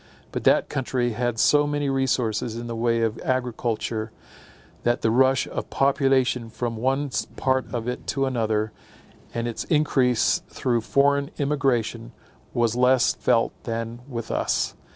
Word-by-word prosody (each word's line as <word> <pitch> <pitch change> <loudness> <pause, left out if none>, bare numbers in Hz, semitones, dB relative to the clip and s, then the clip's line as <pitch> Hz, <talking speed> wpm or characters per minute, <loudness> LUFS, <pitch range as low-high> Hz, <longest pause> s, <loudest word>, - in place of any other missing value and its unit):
But - - -4
that - - +4
country 125 -2 -1
had 120 0 -1
so 145 +5 +4
many 145 -1 -1
resources 125 -4 0
in 120 +1 -5
the 120 -1 -4
way 115 0 +1
of 115 -1 0
agriculture, 115 -3 -2 0.7
that 120 +1 0
the 110 - +3
rush 130 +2 +3
of - - -5
population 135 -3 +2
from 115 +1 -3
one 135 +4 0 0.2
part 130 -1 0
of 120 -2 -3
it 125 - -4
to 135 -1 0
another, 110 -4 0 0.6
and 115 0 -2
its 115 - -3
increase 130 -6 +2
through 120 -2 0
foreign 140 +4 +2
emigration, 135 - 0 0.4
was 120 -1 +1
less 125 0 +4
felt 115 - +1
than 115 0 -4
with 115 -3 -5
us. - - 0
125 Hz, 145 wpm, -24 LUFS, 115-135 Hz, 0.7 s, that